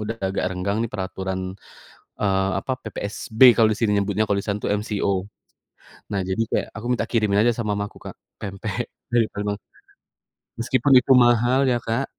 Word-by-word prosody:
udah 110 +2 -3
agak 95 - -2
renggang 95 +3 -2
nih - - -3
peraturan, 95 -1 -4 0.8
eee, 95 -1 +1
apa, 130 - -4
PPSB 110 +2 -6 0.2
kalau 110 -1 +5
di - - -8
sini 110 -3 +2
nyebutnya 100 +1 +1
kalau 100 - +2
di - - -13
sana 100 0 -1
tuh - - -1
MCO. 105 -2 -2 1.0
Nah 100 - 0
jadi 95 +4 0
kayak - - 0
aku 110 +2 -7
minta 115 -2 0
kirimin 105 -4 +2
aja 120 +1 +4
sama 105 -3 -1
mama 100 - -1
aku, - - -17
Kak, - - -11 0.3
pempek 105 +3 -4 0.3
dari 115 -2 +4
Palembang. 105 0 -3 1.0
Meskipun 130 +3 +1
itu 125 - -2
mahal 120 +2 +3
ya, 120 - +2
Kak, 115 +4 0
105 Hz, 175 wpm, -23 LUFS, 100-115 Hz, 1.0 s, kalau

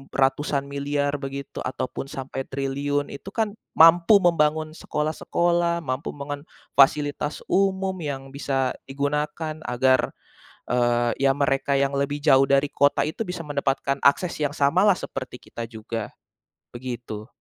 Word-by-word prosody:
ratusan 140 +1 +1
miliar 140 0 -1
begitu 140 0 -6
ataupun 130 +1 -4
sampai 135 -1 -6
triliun 140 +1 -2
itu 140 - -10
kan, 220 -2 +1 0.2
mampu 170 +5 +7
membangun 155 -2 +2
sekolah-sekolah, 170 +2 0
mampu 130 +1 -3
membangun 145 +1 -6 0.3
fasilitas 145 +1 +2
umum, 190 0 +2
yang 135 -3 -5
bisa 135 -2 -1 0.2
digunakan 150 +3 -2
agar, 130 +2 +2 0.6
eee, 120 -1 +2
ya 135 - +5
mereka 140 -1 +1
yang 140 0 +1
lebih 145 +1 -1
jauh 135 0 +6
dari 140 +1 +3
kota 140 0 +3
itu 160 - -8
bisa 180 -2 -5
mendapatkan 140 -1 -1
akses 170 +5 +4
yang 145 -1 0
samalah, 180 +8 +3
seperti 130 -2 -6
kita 115 - -7
juga. 115 -1 -5 0.7
Begitu. 120 -4 -6
140 Hz, 130 wpm, -24 LUFS, 135-155 Hz, 0.7 s, mampu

